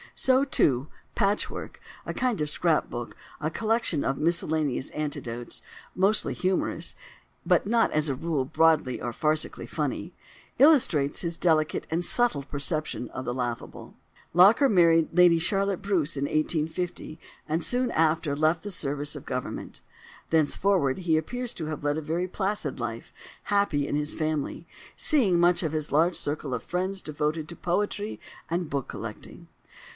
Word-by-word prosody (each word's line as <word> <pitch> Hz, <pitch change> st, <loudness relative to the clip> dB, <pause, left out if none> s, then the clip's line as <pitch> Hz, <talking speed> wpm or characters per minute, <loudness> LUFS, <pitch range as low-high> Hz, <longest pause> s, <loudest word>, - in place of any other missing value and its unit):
So, 260 Hz, +1 st, +4 dB
too, 140 Hz, -, +2 dB, 0.3 s
"Patchwork"—a 205 Hz, -1 st, -2 dB
kind 250 Hz, -9 st, 0 dB
of 150 Hz, -, 0 dB
scrap 165 Hz, 0 st, +1 dB
book, 120 Hz, 0 st, -6 dB, 0.2 s
a 155 Hz, -, -1 dB
collection 225 Hz, -7 st, 0 dB
of 135 Hz, -, -1 dB
miscellaneous 155 Hz, -5 st, 0 dB
anecdotes, 120 Hz, -6 st, -5 dB, 0.3 s
mostly 195 Hz, +3 st, +2 dB
humorous, 185 Hz, 0 st, -1 dB, 0.5 s
but -, -, +3 dB
not 230 Hz, +1 st, +3 dB
as 155 Hz, 0 st, +1 dB
a 135 Hz, -, 0 dB
rule 155 Hz, -1 st, -1 dB
broadly 155 Hz, -2 st, +2 dB
or 120 Hz, -, -4 dB
farcically 155 Hz, +4 st, -1 dB
funny—illustrates 235 Hz, -, +1 dB
his 170 Hz, -1 st, -3 dB
delicate 155 Hz, -3 st, +1 dB
and 165 Hz, +2 st, -1 dB
subtle 205 Hz, -, +2 dB
perception 145 Hz, -2 st, -3 dB
of 130 Hz, -, -6 dB
the 120 Hz, -, -2 dB
laughable. 120 Hz, -2 st, -5 dB, 0.4 s
Locker 200 Hz, -, +6 dB
married 165 Hz, -6 st, +4 dB
Lady 175 Hz, -2 st, +6 dB
Charlotte 195 Hz, +2 st, +1 dB
Bruce 170 Hz, -7 st, 0 dB
in 140 Hz, -, 0 dB
1850, 155 Hz, +2 st, -2 dB, 0.3 s
and 160 Hz, +2 st, 0 dB
soon 250 Hz, +5 st, +1 dB
after 160 Hz, -2 st, +1 dB
left 155 Hz, +3 st, +1 dB
the 205 Hz, -, -5 dB
service 145 Hz, -5 st, -1 dB
of 145 Hz, -, -9 dB
Government. 125 Hz, 0 st, -5 dB, 0.5 s
Thenceforward 160 Hz, -1 st, +2 dB
he 170 Hz, -3 st, +1 dB
appears 245 Hz, +10 st, -3 dB
to 160 Hz, -, -4 dB
have 155 Hz, -2 st, -5 dB
led 145 Hz, +1 st, 0 dB
a -, -, -2 dB
very 165 Hz, +4 st, -2 dB
placid 200 Hz, +2 st, -2 dB
life, -, -, -5 dB, 0.3 s
happy 200 Hz, -9 st, +1 dB
in -, -, -2 dB
his 150 Hz, +1 st, -1 dB
family, 155 Hz, -2 st, -3 dB, 0.3 s
seeing 215 Hz, -, +3 dB
much 175 Hz, +1 st, +4 dB
of 160 Hz, -, -1 dB
his 155 Hz, -1 st, -2 dB
large 165 Hz, +4 st, +3 dB
circle 145 Hz, -2 st, -3 dB
of 125 Hz, -, -3 dB
friends, 185 Hz, +2 st, -2 dB
devoted 150 Hz, +1 st, -2 dB
to 170 Hz, -, -8 dB
poetry 205 Hz, +4 st, -2 dB, 0.3 s
and 170 Hz, -1 st, -2 dB
book 140 Hz, -2 st, -2 dB
collecting. -, -, -8 dB
160 Hz, 150 wpm, -27 LUFS, 145-185 Hz, 0.5 s, Locker